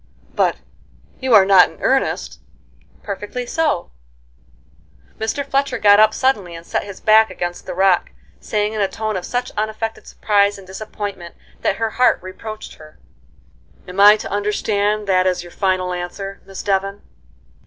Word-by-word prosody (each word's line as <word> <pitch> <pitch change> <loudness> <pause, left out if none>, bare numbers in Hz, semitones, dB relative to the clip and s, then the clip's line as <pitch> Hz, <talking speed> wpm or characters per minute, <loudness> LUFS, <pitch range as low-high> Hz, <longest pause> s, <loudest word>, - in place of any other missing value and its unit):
"But - - +2 0.6
you 260 -3 +3
are 195 - +7
not 190 -2 +6
in - - -17
earnest?" - - 0 0.6
"Perfectly 205 +4 -5
so." 300 - -1 1.3
Mr. 225 +6 -2
Fletcher 275 +1 0
got 205 0 +6
up 215 0 +6
suddenly 215 -9 0
and 165 0 -10
set - - -2
his 200 -2 -9
back 220 0 +5
against 175 0 -5
the - - -5
rock, 190 -1 +3 0.3
saying 210 0 -1
in 215 - -2
a 200 - +2
tone 215 +1 -4
of 180 -1 -4
such 245 0 -3
unaffected 220 +1 -3
surprise 205 -1 +1
and 195 - -13
disappointment 190 -2 -7 0.3
that - - +1
her 225 0 -2
heart 250 - +5
reproached 215 +3 -8
her: 155 0 -15
[Illustration: 65 0 -32
"NO, 60 - -33
I 65 +1 -32
THANK - - -30
YOU."] 180 - -8
"Am 200 +2 +6
I 210 +1 +8
to - - -7
understand 205 0 0
that 185 -1 +3
as 180 -1 0
your 175 - -12
final 185 -1 0
answer, 195 +3 -6
Miss 195 -1 -7
Devon?" 195 0 -1
200 Hz, 175 wpm, -19 LUFS, 185-215 Hz, 1.3 s, I